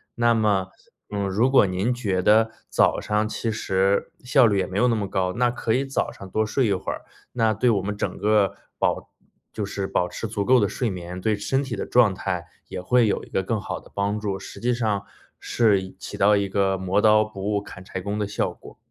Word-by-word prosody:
那 120 0 +3
么， 100 -4 +1 0.4
呃， 100 -1 -2
如 110 +7 +2
果 135 - +6
您 95 +7 0
觉 100 -7 -1
得 110 +3 +4 0.2
早 - - +2
上 105 0 0
其 115 +1 -3
实 95 -2 0
效 125 0 +5
率 100 -2 +1
也 - - +1
没 95 - -5
有 125 +3 +4
那 115 - +2
么 105 - -1
高， 95 -1 0
那 120 0 +2
可 115 -2 -1
以 135 - +2
早 135 0 -2
上 95 - -11
多 110 +3 0
睡 130 +4 +1
一 100 - +2
会 95 - -3
儿， - - -8 0.3
那 115 -2 +2
对 120 +4 +2
我 100 -4 +2
们 100 +2 -4
整 - - -3
个 105 -2 +2 0.2
保 - - 0 0.4
就 105 - -3
是 100 -1 -4
保 90 -2 0
持 115 - -5
足 100 -2 -2
够 130 -2 +5
的 100 - +2
睡 120 - -1
眠， 90 -1 -6
对 105 +2 +1
身 135 +7 0
体 130 -4 -4
的 - - -4
状 115 -6 +4
态 90 -3 -3 0.2
也 - - -5
会 120 +5 +3
有 - - 0
一 - - -18
个 95 - -1
更 110 +3 -1
好 - - -5
的 - - -19
帮 100 +1 -1
助， 100 -2 -3
实 100 +1 -10
际 125 +1 +1
上 110 -4 -1 0.4
是 105 -5 +2
一 95 0 -9
起 - - -7
到 105 +1 +5
一 100 -1 0
个 95 0 +1
磨 95 +2 +1
刀 110 0 +5
不 100 -3 -9
误 100 -1 0
砍 95 -2 -11
柴 95 - -6
工 100 +3 -3
的 105 - 0
效 100 - -1
果。 - - -15
105 Hz, 255 characters per minute, -24 LUFS, 95-115 Hz, 0.4 s, 果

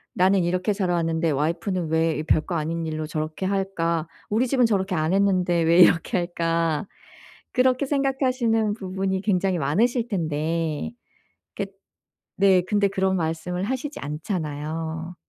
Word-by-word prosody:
'나는 185 0 +3
이렇게 185 +4 0
자라 185 -3 0
왔는데 165 -1 0
와이프는 170 +4 -1
왜 160 -1 +1
별거 160 +3 +1
아닌 165 +1 -2
일로 155 0 -3
저렇게 155 +4 -3
할까? 170 -4 -1 0.2
우리 230 +5 +1
집은 250 -1 +3
저렇게 195 -4 0
안 155 +2 0
했는데 185 -3 +2
왜 170 +2 +4
이렇게 175 +1 +5
할까?' 165 -1 -1 0.7
그렇게 255 +1 +3
생각하시는 255 -6 +1
부분이 190 -1 -2
굉장히 190 -3 +1
많으실 225 - +1
텐데 160 0 -2 0.6
겟 195 0 -4 0.7
네 190 -2 +4
근데 205 +2 +1
그런 190 -1 0
말씀을 165 +2 -2
하시지 265 +6 -3
않잖아요. 160 +1 -4
180 Hz, 305 characters per minute, -24 LUFS, 160-200 Hz, 0.7 s, 이렇게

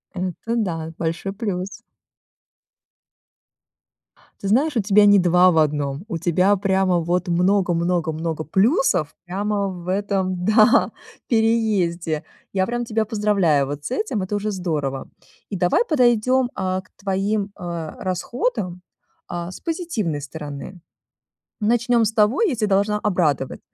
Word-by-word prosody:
Это 185 +6 -3
да, 165 -7 -2
большой 170 +4 -3
плюс. 200 +1 -4 2.6
Ты 195 - -2
знаешь, 280 +6 +2
у 225 - +3
тебя 205 +1 +5
не 205 0 +7
2 180 +1 +5
в 165 - 0
1, 145 0 0
у 170 - -2
тебя 180 +4 +2
прямо 190 -2 +2
вот 175 +3 -1
много 180 +1 +2
много 170 -1 0
много 160 0 -3
плюсов 190 - +2
прямо 200 +2 -1
в 175 -1 -9
этом, 190 -2 -1
да, 215 +5 +5 0.4
переезде. 205 -9 +1 0.3
Я 190 -1 +1
прям 240 +2 -2
тебя 220 -1 0
поздравляю 200 -10 +2
вот 145 +1 -6
с - - -4
этим, 255 - -1
это 205 +2 -3
уже 210 +1 -2
здорово. 150 -8 -3 0.4
И 200 - -4
давай 180 - +2
подойдем, 250 - +3
а, 185 0 -2
к 185 - -27
твоим, 200 +1 -1
э, 170 -4 -5
расходам, 185 - -2 0.5
э, 175 +1 -4
с - - -10
позитивной 255 - -2
стороны. 150 +4 -8 0.8
Начнем 235 +1 +2
с 215 - 0
того, 220 - +2
я 355 - +2
тя 215 -1 0
должна 205 +1 +2
обрадовать. 170 - 0
190 Hz, 135 wpm, -22 LUFS, 170-215 Hz, 2.6 s, не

